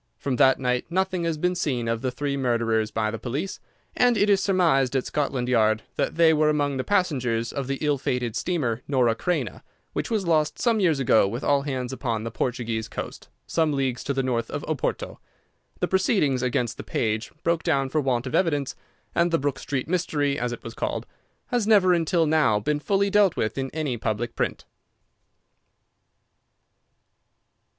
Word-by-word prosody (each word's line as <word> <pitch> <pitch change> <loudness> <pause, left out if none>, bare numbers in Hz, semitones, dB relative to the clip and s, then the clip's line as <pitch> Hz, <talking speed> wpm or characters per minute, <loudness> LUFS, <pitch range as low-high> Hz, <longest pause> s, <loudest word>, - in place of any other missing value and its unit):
From 130 -3 -2
that 130 +1 +5
night 125 -1 0
nothing 185 0 0
has 165 -2 -1
been 180 +3 +1
seen 130 -9 -1
of 115 0 -1
the 130 - 0
three 140 +2 -2
murderers 115 -4 +1
by 110 -1 -1
the 115 - -5
police, 145 +11 -4 0.4
and 245 -2 +3
it 205 0 +3
is 195 -1 +4
surmised 160 -10 +2
at 130 - +1
Scotland 140 -4 -1
Yard 110 -3 +2
that - - -1
they 165 -1 +5
were 155 0 +3
among 145 -2 0
the 130 - -1
passengers 125 - 0
of 140 -3 -3
the 135 0 -2
ill 145 -2 +1
fated 125 -4 -2
steamer 130 -10 -1
Norah 125 -5 +3
Creina, 140 - -2 0.3
which - - -2
was 215 -5 0
lost 155 -2 +1
some 230 -3 +2
years 165 -7 +2
ago 115 -6 +4
with 115 +6 -4
all 140 -1 +3
hands 130 -3 -3
upon 115 -5 -2
the 115 - -4
Portuguese 115 -2 -2
coast, - - -7 0.2
some 160 -2 +1
leagues 135 -3 -1
to - - -1
the 135 -1 0
north 120 -3 -1
of 145 - -4
Oporto. 155 -4 -3 0.6
The - - +2
proceedings 185 - +2
against 120 -2 -1
the - - -6
page 110 0 -2
broke 170 0 +1
down 140 -5 +1
for 155 +3 +1
want 130 -3 0
of 130 - -5
evidence, 145 -7 +1 0.4
and 170 +1 +2
the 165 - +2
Brook 140 -1 -2
Street 135 -3 -3
Mystery, 155 -5 0
as 120 0 -1
it 120 - -7
was 115 - -7
called, - - -3 0.4
has 240 -4 0
never 195 -4 +5
until 170 0 +2
now 150 -9 +3
been 150 +8 -1
fully 200 +5 +1
dealt 205 -3 +4
with 110 -1 -1
in 135 -1 -2
any 150 -6 -2
public 115 +2 -2
print. - - -2
140 Hz, 185 wpm, -25 LUFS, 120-165 Hz, 0.6 s, that